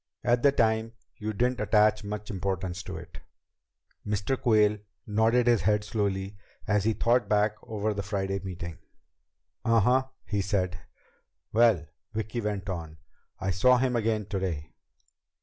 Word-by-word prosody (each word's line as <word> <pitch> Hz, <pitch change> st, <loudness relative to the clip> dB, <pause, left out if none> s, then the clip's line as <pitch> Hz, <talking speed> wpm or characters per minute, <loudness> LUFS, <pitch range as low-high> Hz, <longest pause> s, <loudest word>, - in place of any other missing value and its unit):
At 120 Hz, 0 st, +3 dB
the 140 Hz, -, +5 dB
time 110 Hz, -2 st, +1 dB, 0.2 s
you 110 Hz, -2 st, -3 dB
didn't 125 Hz, +4 st, 0 dB
attach 105 Hz, -1 st, +3 dB
much 105 Hz, +1 st, -5 dB
importance 95 Hz, -2 st, -3 dB
to -, -, -7 dB
it." -, -, -10 dB, 0.8 s
Mr. 105 Hz, +5 st, -1 dB
Quayle 105 Hz, -5 st, +3 dB, 0.3 s
nodded 110 Hz, +3 st, +3 dB
his 120 Hz, -4 st, +4 dB
head 105 Hz, +3 st, +2 dB
slowly 100 Hz, -1 st, -2 dB, 0.3 s
as 105 Hz, -1 st, +1 dB
he 110 Hz, -, +3 dB
thought 120 Hz, +3 st, +2 dB
back 105 Hz, 0 st, +3 dB
over 110 Hz, 0 st, -2 dB
the 100 Hz, -, -3 dB
Friday 95 Hz, -1 st, -2 dB
meeting. 90 Hz, -3 st, -7 dB, 0.8 s
"Uh 115 Hz, 0 st, +4 dB
huh," 125 Hz, +5 st, +3 dB, 0.2 s
he 100 Hz, -1 st, -1 dB
said. 95 Hz, -2 st, -1 dB, 0.7 s
"Well," 110 Hz, -8 st, +4 dB, 0.3 s
Vicki 110 Hz, +2 st, -3 dB
went 105 Hz, -3 st, -3 dB
on, 80 Hz, -4 st, -5 dB, 0.4 s
"I 95 Hz, 0 st, -1 dB
saw 125 Hz, +8 st, +5 dB
him 125 Hz, 0 st, +1 dB
again 110 Hz, -2 st, 0 dB
today." 95 Hz, -7 st, -3 dB
105 Hz, 145 wpm, -28 LUFS, 95-115 Hz, 0.8 s, the